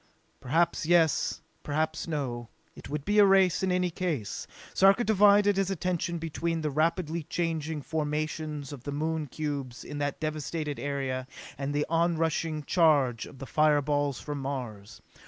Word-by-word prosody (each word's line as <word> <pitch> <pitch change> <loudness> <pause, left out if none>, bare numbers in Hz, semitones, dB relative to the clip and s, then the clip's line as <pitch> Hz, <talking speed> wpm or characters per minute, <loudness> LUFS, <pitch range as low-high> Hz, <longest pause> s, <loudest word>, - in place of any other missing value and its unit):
Perhaps 160 +4 +1
yes, 165 -2 +3 0.2
perhaps 155 +3 -2
no. 125 -7 -3 0.3
It - - -11
would 150 0 -4
be 210 0 +3
a 205 - +8
race, 190 -2 +4
in 190 -1 +1
any 180 -1 +1
case. 165 - -3 0.3
Sarka 195 +5 +5
divided 205 -1 +5
his 195 -1 +1
attention 175 -2 -1
between 165 0 -2
the 150 -1 -1
rapidly 165 +2 0
changing 160 -2 -2
formations 150 -1 -3
of 135 - -9
the 145 - -4
Moon 155 +1 -2
cubes 140 -4 -4
in 145 - -6
that 145 -1 -2
devasted 155 -1 -3
area 135 -2 -2 0.3
and 140 0 -3
the 145 +1 0
onrushing 165 -2 0
charge 145 -8 +3
of - - -13
the 135 - -7
fire 150 +1 +3
balls 145 -2 0
from 145 -1 -5
Mars. 120 -7 -6
155 Hz, 155 wpm, -28 LUFS, 145-170 Hz, 0.3 s, a